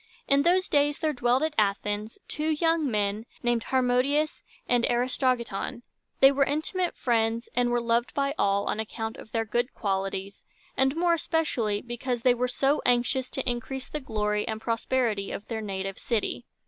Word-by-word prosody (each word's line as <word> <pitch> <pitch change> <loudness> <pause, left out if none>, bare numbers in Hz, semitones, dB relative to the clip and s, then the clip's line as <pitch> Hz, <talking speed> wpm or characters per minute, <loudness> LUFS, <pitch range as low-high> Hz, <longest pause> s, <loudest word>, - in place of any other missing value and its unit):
In 280 0 +4
those 365 +4 +3
days 290 0 +2
there 310 -1 0
dwelt 245 +2 +2
at 315 -1 0
Athens 205 +1 -1
two 305 +1 -2
young 320 -1 +2
men 210 0 -1 0.2
named 240 -1 +1
Har 260 -1 +2
mo´di 250 +4 +3
us 310 0 -3 0.3
and 245 -1 +2
A - - +2
ris 250 +1 0
to 270 - 0
gi´ton. 235 -1 -1 0.4
They 270 0 +9
were 275 0 +3
intimate 315 +6 -1
friends, 230 -1 0
and 245 0 +2
were 240 0 +2
loved 235 +1 0
by 280 0 +1
all 200 -3 +1
on - - -1
account 220 0 -4
of 220 - -12
their 225 0 0
good 240 +4 -1
qualities, 195 -1 -3 0.3
and 265 +2 +2
more 340 +1 +3
especially 260 -11 0
because 240 0 -3
they 250 - +6
were 250 +1 0
so 270 +4 +1
anxious 250 +1 +2
to - - -3
increase 250 +2 -3
the 300 - -4
glory 210 -5 -1
and 220 -1 -3
prosperity 230 -3 -1
of 205 - -6
their 225 -2 -3
native 195 -2 -4
city. 230 -3 -2
240 Hz, 185 wpm, -27 LUFS, 220-275 Hz, 0.4 s, They